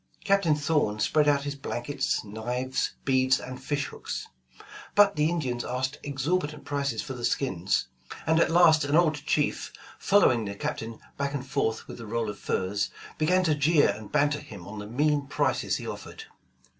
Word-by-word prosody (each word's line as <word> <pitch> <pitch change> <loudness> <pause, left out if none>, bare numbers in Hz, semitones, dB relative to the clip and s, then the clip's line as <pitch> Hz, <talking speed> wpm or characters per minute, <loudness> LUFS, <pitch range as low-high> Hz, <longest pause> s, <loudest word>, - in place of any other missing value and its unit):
Captain 195 -6 +3
Thorn 145 -8 +1
spread 150 +7 +3
out 140 -1 +3
his 145 0 -3
blankets, 140 -1 -2
knives, 120 +5 -2
beads 130 -1 +3
and 130 0 -8
fish 140 0 -1
hooks, - - -6 0.7
but 205 -1 +6
the 150 +1 +2
Indians 130 -8 -2
asked 130 +3 -2
exorbitant 145 +2 -2
prices 140 -1 -1
for 130 - -6
the 120 -2 -8
skins, 100 -7 0 0.4
and 160 +1 +3
at - - +4
last 165 -2 +6
an 145 +1 +1
old 165 -2 +5
chief, 150 0 -1 0.3
following 160 - +4
the 100 0 -5
Captain 110 +2 -4 0.2
back 140 0 -1
and 135 -2 -4
forth 125 -5 -1
with - - -9
a 115 - -8
roll 115 -1 -1
of - - -12
furs, 100 +2 -1 0.3
began 180 +4 +3
to 160 -4 +3
jeer 150 +1 +4
and 105 -1 -5
banter 145 +1 +2
him 100 - -11
on 105 +1 -7
the 105 - -7
mean 145 +4 +1
prices - - 0
he - - -5
offered. 445 - -7
140 Hz, 175 wpm, -27 LUFS, 120-150 Hz, 0.7 s, but